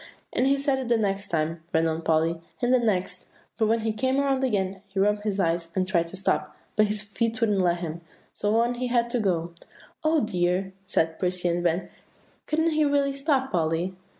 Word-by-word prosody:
"And 260 - +2
he 275 +1 +3
said 275 -1 +1
it 260 - -4
the 235 -1 +3
next 200 -2 -1
time," 165 -1 -1
ran 160 0 +2
on 160 0 -1
Polly, 165 +1 +1 0.2
"and 245 +1 +2
the 255 - +5
next; 195 -5 -1 0.3
but 220 - +3
when 225 +1 +2
he 220 0 -1
came 260 +5 +1
around 270 -1 +1
again, 195 -6 0
he 195 0 -11
rubbed 205 +1 +2
his 205 -2 -2
eyes, 165 -2 0
and 185 - +2
tried 170 -3 +1
to 170 - -8
stop, 190 - -1 0.2
but 215 0 +4
his 210 0 0
feet 230 +3 -2
wouldn't 210 -4 +2
let 175 -1 +1
him; 170 0 -5 0.3
so 210 +1 0
on 240 +1 +2
he 250 +1 -3
had 240 -1 +1
to 245 - +1
go." 170 -5 0 0.5
"Oh, 310 0 +3
dear!" 185 -2 0
said 160 -3 0
Percy 180 -1 +1
and 170 +1 0
Van, 175 +1 0 0.6
"couldn't 320 +2 +1
he 310 0 +2
really 285 -1 +2
stop, 275 -1 0
Polly?" 165 +2 0
205 Hz, 210 wpm, -26 LUFS, 175-245 Hz, 0.6 s, the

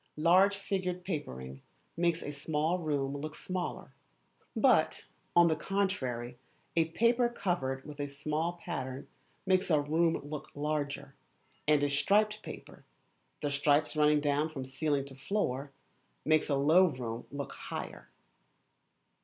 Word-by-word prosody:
Large 185 +6 +5
figured 185 -2 -2
papering 65 - -5 0.3
makes 170 -1 +1
a 145 - -4
small 155 +4 -1
room 145 -4 -1
look 155 +2 -5
smaller, 180 -1 -4 0.6
but, - - +3 0.3
on 175 0 +7
the 160 - +2
contrary, 130 -11 -2 0.4
a 165 -1 +4
paper 235 +8 +2
covered 140 - -2
with 150 -1 -9
a 145 - -1
small 150 +4 -2
pattern 140 -6 -5 0.4
makes 185 0 +2
a 155 -3 +5
room 160 +3 +2
look 150 -1 -6
larger, 145 -1 -2 0.5
and 150 -1 +4
a 145 - +2
striped 210 +9 +2
paper, - - -10 0.6
the 145 - 0
stripes 145 +2 +2
running 150 -1 +4 0.3
from 135 -4 -6
ceiling 140 +1 -1
to 140 - -11
floor, 135 -2 -2 0.5
makes 155 0 +3
a 140 - +3
low 155 +7 +6
room 125 -7 -4
look 140 0 -5
higher. - - -7
150 Hz, 130 wpm, -31 LUFS, 140-175 Hz, 0.6 s, on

